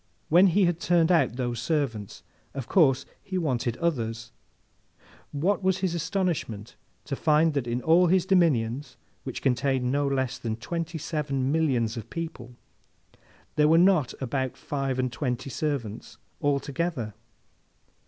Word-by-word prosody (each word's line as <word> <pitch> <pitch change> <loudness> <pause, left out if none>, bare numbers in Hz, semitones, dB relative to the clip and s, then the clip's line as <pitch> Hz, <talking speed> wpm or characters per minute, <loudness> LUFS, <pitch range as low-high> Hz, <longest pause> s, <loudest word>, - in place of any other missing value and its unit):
When 180 +5 +6
he 190 +2 +3
had 175 -1 0
turned 170 -1 +3
out 140 -9 +3
those 120 -2 -2
servants, 120 - -2 0.3
of 135 -3 -5
course 135 -7 +3 0.2
he 190 - -4
wanted 125 -8 -1
others. 115 -8 -2 1.0
What 175 +9 0
was 190 -1 +2
his 185 -2 -1
astonishment 165 - -2 0.3
to 140 - -3
find 155 +2 +3
that 140 -4 -1
in 120 +1 -2
all 175 +3 +5
his 185 +1 +3
dominions, 145 -9 +1 0.3
which - - -5
contained 130 0 +1
no 145 +1 +1
less 130 -2 -1
than 110 -2 -3
twenty 165 +8 -4
seven 140 -4 -2
millions 125 -8 +1
of 115 0 -7
people, 130 -8 -6 1.0
there 150 0 +5
were 160 +2 +5
not 175 -6 +4
above 130 0 -2
five 135 -2 -3
and 130 -1 0
twenty 125 +1 -3
servants 135 -9 -4 0.2
altogether! 140 -3 -1
140 Hz, 140 wpm, -27 LUFS, 125-165 Hz, 1.0 s, When